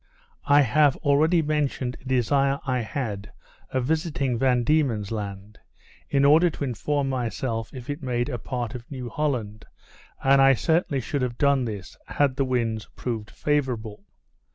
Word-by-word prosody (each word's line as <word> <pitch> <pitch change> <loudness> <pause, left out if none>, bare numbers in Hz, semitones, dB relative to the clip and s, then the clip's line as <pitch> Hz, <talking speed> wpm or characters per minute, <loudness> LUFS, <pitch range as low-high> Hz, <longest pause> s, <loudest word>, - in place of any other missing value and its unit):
I 145 +1 +6
have 145 +2 +4
already 160 +4 +3
mentioned 145 -4 -1
a - - -22
desire 135 +2 +2
I 130 -2 0
had 110 -4 -4 0.4
of 130 -1 -1
visiting 150 -4 0
Van 125 -2 +2
Diemen's 120 -8 +1
Land, 100 -1 -6 0.5
in 140 -1 +3
order 160 +5 +6
to 155 - -6
inform 140 +3 -1
myself 115 -3 -2
if 125 -3 -9
it 145 +2 -4
made 120 -2 -1
a 125 -5 -4
part 120 -2 -4
of 125 -2 -9
New 130 -4 -6
Holland; 115 -7 -2 0.6
and 135 0 +5
I 135 0 +6
certainly 160 -2 +1
should 145 +3 -3
have 120 -2 -2
done 140 -3 +3
this, 100 -5 -6
had 140 -3 +1
the 135 - +1
winds 115 -4 -1
proved 110 -4 -4
favourable. 120 -8 -2
130 Hz, 155 wpm, -25 LUFS, 115-145 Hz, 0.6 s, I